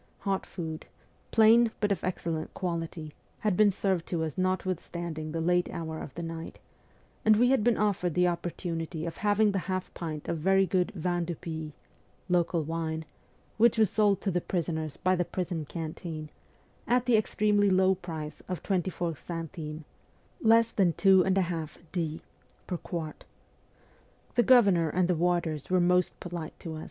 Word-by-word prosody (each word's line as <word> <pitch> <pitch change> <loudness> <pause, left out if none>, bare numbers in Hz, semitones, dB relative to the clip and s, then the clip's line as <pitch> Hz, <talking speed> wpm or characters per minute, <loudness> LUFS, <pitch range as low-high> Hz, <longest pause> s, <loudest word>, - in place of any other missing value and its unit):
Hot 195 -2 -1
food, 160 -3 -6 0.4
plain 230 +1 +6
but 205 -1 +1
of 200 - -1
excellent 165 -3 -3
quality, 165 -3 -4 0.3
had 210 -4 +1
been 210 +2 +5
served 190 -3 -1
to 165 -2 -1
us 155 -2 -3
notwithstanding 175 -4 -2
the 165 - -2
late 175 +2 +2
hour 160 -1 -5
of - - -7
the 170 - -5
night, 165 0 -6 0.7
and 215 0 +6
we 245 +4 +4
had 265 -6 +3
been 235 -1 +3
offered 195 -5 0
the 180 0 +4
opportunity 170 -1 -3
of 165 - -5
having 210 0 +3
the 195 - 0
half 185 0 -2
pint 155 -3 -5
of 165 - -2
very 195 +4 +4
good 185 0 +1
vin 175 0 -1
du 170 0 -3
pays 160 -1 -6 0.6
(local 170 -2 +2
wine) 160 0 -3 0.5
which 230 +1 +5
was 220 -3 +4
sold 205 -3 +3
to 195 - 0
the 175 0 0
prisoners 160 -4 -2
by 185 0 +2
the 175 - +1
prison 175 -2 -3
canteen, 155 0 -6 0.6
at 245 0 +2
the 245 -2 +4
extremely 210 -1 +2
low 190 0 +4
price 160 -4 -7
of 180 - -4
24 175 -3 -1
centimes 160 +1 -6 0.6
(less 230 0 +5
than 180 -5 +2
2^d.) 175 -3 +1 0.4
per 180 - -3
quart. 165 -3 -6 1.1
The 240 - +4
governor 200 -10 +5
and 180 +3 +1
the 180 - +2
warders 170 -3 0
were 185 0 +3
most 180 0 +2
polite 170 -3 -6
to 160 -2 -5
us. - - -6
175 Hz, 160 wpm, -29 LUFS, 165-195 Hz, 1.1 s, plain